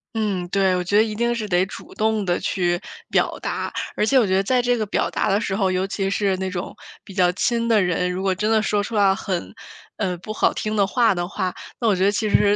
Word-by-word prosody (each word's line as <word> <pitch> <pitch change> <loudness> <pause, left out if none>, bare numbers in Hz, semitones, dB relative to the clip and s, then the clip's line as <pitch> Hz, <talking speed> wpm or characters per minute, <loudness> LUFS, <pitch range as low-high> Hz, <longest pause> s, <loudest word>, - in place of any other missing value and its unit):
嗯， 200 -5 -1
对， 190 -1 +2
我 180 - -1
觉 180 +3 -1
得 215 - +6
一 215 -1 -4
定 235 +2 +1
是 225 -3 -3
得 180 +1 +3
主 190 - -11
动 220 -1 +1
地 175 -2 0
去 175 -2 0 0.3
表 - - +1
达。 - - -3 0.2
而 210 - +1
且 265 +4 +4
我 225 - +2
觉 190 - +1
得 195 - +2
在 250 +4 +2
这 245 0 +1
个 215 - -1
表 205 - 0
达 - - -1
的 200 +1 +2
时 195 -4 -2
候， 195 -2 +1
尤 185 +1 0
其 195 -1 -2
是 195 -1 0
那 190 0 -3
种 180 0 -5 0.3
比 195 - -12
较 180 -2 +4
亲 235 +4 0
的 220 -3 +4
人， 180 0 0
如 185 - -3
果 190 -1 +1
真 210 +4 0
的 220 - +4
说 210 -1 0
出 225 - -7
来 200 -2 +4
很， 185 -3 -4 0.4
嗯， 185 -4 -2
不 215 +5 -7
好 - - +2
听 215 0 -3
的 200 -2 +3
话 225 -1 +2
的 175 0 -2
话， 185 -1 -3 0.2
那 235 - 0
我 210 - +4
觉 185 - 0
得 200 - +4
其 210 +1 -1
实 205 0 +4
200 Hz, 285 characters per minute, -22 LUFS, 185-215 Hz, 0.4 s, 得